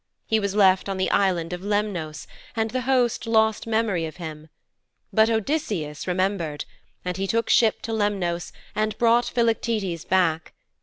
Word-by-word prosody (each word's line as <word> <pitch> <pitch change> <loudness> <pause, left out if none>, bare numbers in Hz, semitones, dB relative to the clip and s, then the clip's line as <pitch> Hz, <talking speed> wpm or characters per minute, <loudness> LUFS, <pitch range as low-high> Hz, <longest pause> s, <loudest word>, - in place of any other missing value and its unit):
He 220 - +2
was 200 -1 -2
left 190 -2 +4
on 195 - -2
the 190 - 0
Island 180 -4 +1
of 180 - -5
Lemnos 200 -7 -2 0.3
and 225 -1 0
the 255 +1 -1
host 245 -4 +2
lost 220 -1 +2
memory 220 -7 0
of 155 - -10
him. 160 -3 -8 0.6
But 220 0 +5
Odysseus 220 - -2
remembered, 180 -5 -1 0.4
and 180 0 -2
he 195 0 -2
took 230 +3 0
ship 225 -2 +3
to 225 - -3
Lemnos 195 -5 -1 0.2
and 215 0 -1
brought 235 +1 +4
Philoctetes 225 -7 0
back. 165 -4 +1
200 Hz, 155 wpm, -24 LUFS, 175-225 Hz, 0.6 s, But